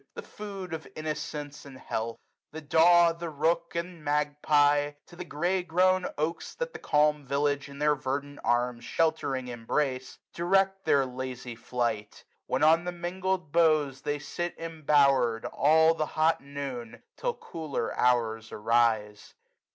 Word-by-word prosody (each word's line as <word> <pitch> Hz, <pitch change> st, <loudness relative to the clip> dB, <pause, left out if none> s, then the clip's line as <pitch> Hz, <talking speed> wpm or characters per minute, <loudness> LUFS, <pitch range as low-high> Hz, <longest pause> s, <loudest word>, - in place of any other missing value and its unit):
The -, -, -6 dB
food 195 Hz, -4 st, -8 dB
of 160 Hz, -1 st, -6 dB
innocence, 150 Hz, -1 st, -5 dB
and 135 Hz, -2 st, -11 dB
health! 115 Hz, -2 st, -4 dB, 0.3 s
The 160 Hz, -, -6 dB
daw. 170 Hz, +3 st, +5 dB
The 170 Hz, 0 st, -6 dB
rook 165 Hz, +3 st, 0 dB
and 170 Hz, -1 st, -4 dB
magpie, 145 Hz, 0 st, +2 dB
to 175 Hz, -, -15 dB
the 180 Hz, -, -6 dB
grey*grown 180 Hz, +2 st, +1 dB
oaks 155 Hz, +3 st, -3 dB
225 -, -, -37 dB
That -, -, -3 dB
the -, -, -7 dB
calm 150 Hz, 0 st, +2 dB
village 140 Hz, +1 st, 0 dB
in 140 Hz, -, -11 dB
their 150 Hz, +1 st, +3 dB
verdant 140 Hz, +1 st, -4 dB
arms. 120 Hz, 0 st, 0 dB
Sheltering, 150 Hz, -4 st, 0 dB
embrace, 130 Hz, +2 st, -2 dB, 0.2 s
direct 195 Hz, +2 st, +1 dB
their 140 Hz, -1 st, +4 dB
lazy 125 Hz, -1 st, -6 dB
flight; 115 Hz, -3 st, -3 dB, 0.2 s
Where -, -, +2 dB
on 165 Hz, +2 st, +5 dB
the 180 Hz, -, -2 dB
mingling 180 Hz, -1 st, -3 dB
boughs 155 Hz, -5 st, +3 dB
they 145 Hz, +1 st, -2 dB
sit 175 Hz, +4 st, -5 dB
embower'd. 140 Hz, -7 st, +2 dB
All 160 Hz, +2 st, +4 dB
the 155 Hz, -2 st, -2 dB
hot 160 Hz, +2 st, +1 dB
noon, 140 Hz, -5 st, -7 dB
till -, -, -2 dB
cooler 165 Hz, -, -4 dB
hours 115 Hz, -3 st, +1 dB
arise. 110 Hz, -2 st, 0 dB
150 Hz, 145 wpm, -28 LUFS, 130-170 Hz, 0.3 s, daw